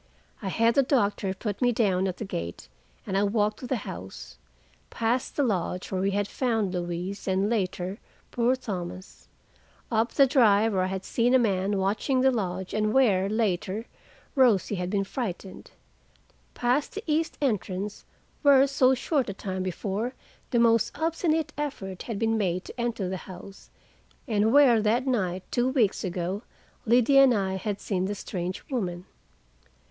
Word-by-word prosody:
I 200 - -4
had 230 +4 +2
the 275 - +5
doctor 210 -7 +1
put 205 +1 -4
me 245 -1 +4
down 195 -5 +1
at 185 - -4
the 220 - -5
gate, 85 - -6 0.4
and 190 - -3
I 195 - +3
walked 210 +1 +1
to 250 - -7
the 260 - 0
house—past 65 - -5
the 290 - +2
lodge 185 -5 -2
where 185 -1 -1
we 195 - +1
had 200 0 0
found 225 -7 -1
Louise, 175 +3 -4
and, 190 +1 +1
later, 190 -2 -2 0.3
poor 245 +2 +2
Thomas; 185 -6 -7 0.6
up 225 +1 +1
the 275 - +6
drive 225 -5 +4
where 190 - +1
I 185 - +1
had 190 0 -4
seen 245 +2 +2
a - - +8
man 200 -4 +1
watching 210 +7 +1
the 265 0 +5
lodge 190 -5 -3
and 215 0 +1
where, 200 -8 +3
later, 210 -1 -1 0.5
Rosie 235 -7 +3
had 180 -2 -2
been 200 0 0
frightened; 195 -4 -6 0.9
past 250 +8 0
the 420 - -5
east 320 +1 0
entrance, 205 -6 -2 0.4
where 275 -2 +6
so 265 -1 +3
short 265 -1 0
a - - -3
time 190 -2 -4
before 200 +6 -3 0.3
the 240 - +1
most 230 +1 +3
obstinate 320 0 0
effort 195 -11 -4
had 225 - -2
been 225 +1 +1
made 185 -2 -1
to 240 - -7
enter 230 -5 -1
the 185 +1 -3
house, 190 +2 -11 0.6
and 215 -1 +2
where, 260 -5 +6
that 230 +5 +1
night 190 -8 -1
two 245 +1 +1
weeks 240 -7 +1
ago, 180 +2 -3 0.5
Liddy 250 +4 +5
and 265 -3 +6
I 190 -2 -1
had 205 +1 -3
seen 185 -3 -1
the 205 +2 -2
strange 185 -2 -5
woman. 180 -8 -3
210 Hz, 165 wpm, -27 LUFS, 190-245 Hz, 0.9 s, a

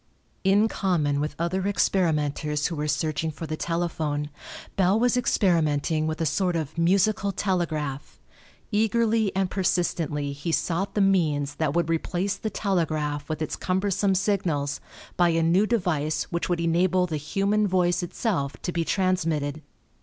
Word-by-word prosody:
In 200 +3 +4
common 160 -10 0
with 150 0 -2
other 185 +3 -1
experimenters 150 -6 +1
who 170 - -1
were 150 0 -2
searching 155 +2 -1
for 160 +1 -6
the 155 0 -3
telephone, 155 -3 -2 0.4
Bell 195 +2 +3
was 245 +1 +3
experimenting 160 -9 +1
with 155 0 -3
a 165 - 0
sort 175 +4 0
of 160 -2 -3
musical 195 +4 +2
telegraph. 155 -8 -2 0.5
Eagerly 220 0 +2
and 190 -1 0
persistently 165 -6 0
he 145 +4 -4
sought 175 +4 -1
the 205 - +2
means 155 -7 +2
that 155 -2 0
would 170 -2 +2
replace 175 +4 -1
the 220 - -4
telegraph 155 -8 -1
with 155 0 -2
its 155 - -3
cumbersome 190 +1 0
signals 165 -8 0 0.4
by 175 -1 +4
a 165 0 +2
new 180 +6 +3
device 175 -9 0
which 170 +1 -2
would 175 -1 0
enable 175 +2 +2
the 160 -3 -3
human 200 +8 0
voice 180 -1 +2
itself 175 - -2
to 180 - -1
be 170 -1 0
transmitted. 165 -6 0
170 Hz, 150 wpm, -25 LUFS, 155-195 Hz, 0.5 s, In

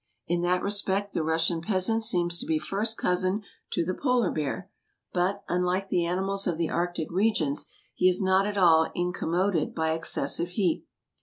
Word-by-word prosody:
In 175 +1 0
that 180 +1 +1
respect 200 0 -1
the - - 0
Russian 165 +1 0
peasant 210 +4 +1
seems 175 -5 +1
to - - -4
be 160 - +2
first 200 +8 -2
cousin 185 +3 +1 0.3
to 170 - 0
the 185 - -1
polar 250 +1 +1
bear, 155 +4 -3 0.5
but, 180 +2 0
unlike 180 +2 0
the 175 -2 +1
animals 195 +3 -1
of 170 -3 0
the 165 -1 -1
arctic 175 -2 -2
regions, 175 -7 +1 0.3
he 185 - +4
is 180 - +2
not 190 0 +3
at 205 -1 -3
all 165 -4 +5
incommoded 175 0 0
by 160 -1 0
excessive 165 +1 -1
heat. 180 -3 -1
180 Hz, 170 wpm, -27 LUFS, 170-195 Hz, 0.5 s, all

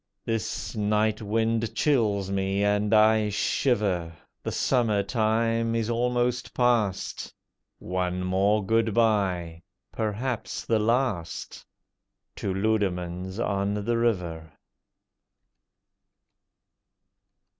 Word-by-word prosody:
This 115 +1 -3
night 105 +1 +1
wind 115 +1 0
chills 105 -10 +1
me, 95 +1 0
and 105 +1 +1
I 110 0 +5
shiver; 105 -5 0 0.3
The - - -4
Summer 110 -6 +1
time 115 +2 +1
is 115 0 0
almost 120 +1 0
past. 115 -6 0 0.5
One 90 0 -2
more 95 +3 +2
good 115 0 +1
bye—perhaps 105 +3 -2
the 115 -1 +2
last 110 -6 -1 0.7
To 95 - -2
Leudemanns 95 -3 -1
on 100 -2 0
the 105 +3 -1
River. 85 -9 -1
105 Hz, 85 wpm, -26 LUFS, 95-115 Hz, 0.7 s, I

